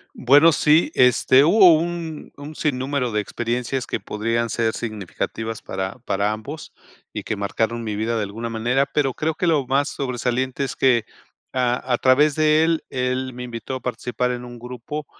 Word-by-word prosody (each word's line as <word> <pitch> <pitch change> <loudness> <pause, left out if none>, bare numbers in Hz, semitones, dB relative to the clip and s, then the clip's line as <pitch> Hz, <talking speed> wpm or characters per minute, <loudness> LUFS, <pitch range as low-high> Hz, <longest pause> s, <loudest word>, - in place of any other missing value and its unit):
Bueno, 145 +6 +6
sí, 155 +1 +3
este, 125 +2 +5
hubo 180 0 +7
un 165 -1 -5
un 145 +2 -9
sin 145 -5 -1
número 130 -2 -1
de 105 - 0
experiencias 120 +4 -3
que - - -3
podrían 115 +2 -2
ser 115 -1 0
significativas 110 +1 -5
para 95 +5 -5
para 105 -2 -1
ambos 140 +9 -7 0.4
y - - -5
que 110 - -3
marcaron 110 +3 -2
mi 110 -2 -3
vida 110 +3 -1
de 105 - 0
alguna 115 +4 -5
manera, 120 +5 +1
pero 140 -2 0
creo 155 +3 -2
que 180 - -1
lo 150 -5 +2
más 140 +2 +1
sobresaliente 130 0 -2
es 135 - -4
que 125 -4 +3 0.5
a 125 0 0
a - - +3
través 140 +3 +4
de 155 0 +4
él 165 0 +1
él 130 0 -2
me 125 +1 -7
invitó 120 +1 -6
a 130 - -4
participar 125 0 -2
en 125 0 -5
un 120 -1 -10
grupo, 125 +5 -7
125 Hz, 180 wpm, -22 LUFS, 115-145 Hz, 0.5 s, hubo